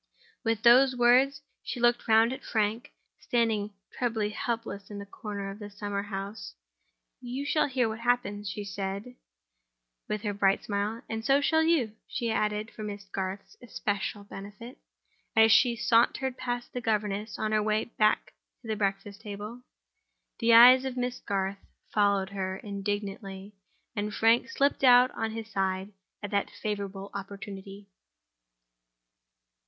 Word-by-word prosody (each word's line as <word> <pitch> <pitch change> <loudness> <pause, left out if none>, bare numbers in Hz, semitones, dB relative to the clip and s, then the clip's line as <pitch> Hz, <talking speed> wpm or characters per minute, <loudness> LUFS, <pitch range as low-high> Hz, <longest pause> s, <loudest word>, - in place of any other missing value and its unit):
With 225 -1 0
those 255 +2 +7
words, 255 +4 +4 0.2
she 250 - -5
looked 240 0 +2
round 225 +2 +5
at - - -8
Frank, 220 +1 -1 0.3
standing 220 -4 0 0.2
trebly 225 -4 -1
helpless 225 -2 -4
in 205 -1 -7
a 200 - -7
corner 200 -1 -6
of 200 - -10
the 205 -1 -7
summer 205 -1 -4
house. 200 +1 -6 0.7
"You 255 +3 -4
shall 300 +1 +2
hear 255 -3 +1
what 220 0 -5
happens," 230 -4 0
she 205 0 -5
said, 200 +3 -5 1.0
with 210 0 -2
her 205 -2 -1
bright 195 -1 +2
smile. 210 +3 -2
"And 225 0 -4
so 275 +4 +4
shall 320 +2 +3
you," 320 -10 +2
she 235 -3 -2
added 210 0 -1
for - - -10
Miss 205 -1 -5
Garth's 195 0 -5
especial 205 -3 -3
benefit, 205 +5 -10 0.6
as 220 0 +6
she 240 +1 +5
sauntered 240 +3 +2
past 245 -1 -4
the 250 - -3
governess 210 -1 -1
on 215 - -1
her 215 0 +3
way 215 0 +1
back 215 -2 +1 0.3
to - - -11
the 220 - -1
breakfast 200 0 -2
table. 210 +3 -7 0.8
The 230 -1 +3
eyes 250 +3 +9
of 260 -1 -4
Miss 250 0 -2
Garth 195 0 -2 0.3
followed 200 -2 +2
her 190 -1 -3
indignantly; 200 -1 -5 0.4
and 210 0 -2
Frank 225 +4 +3
slipped 275 +1 +1
out 250 0 +7
on 225 0 -3
his 225 -1 -6
side 190 +1 -1 0.3
at 205 - -5
that 200 -1 0
favorable 200 -2 -5
opportunity. 200 0 -8
215 Hz, 150 wpm, -28 LUFS, 200-240 Hz, 1.0 s, eyes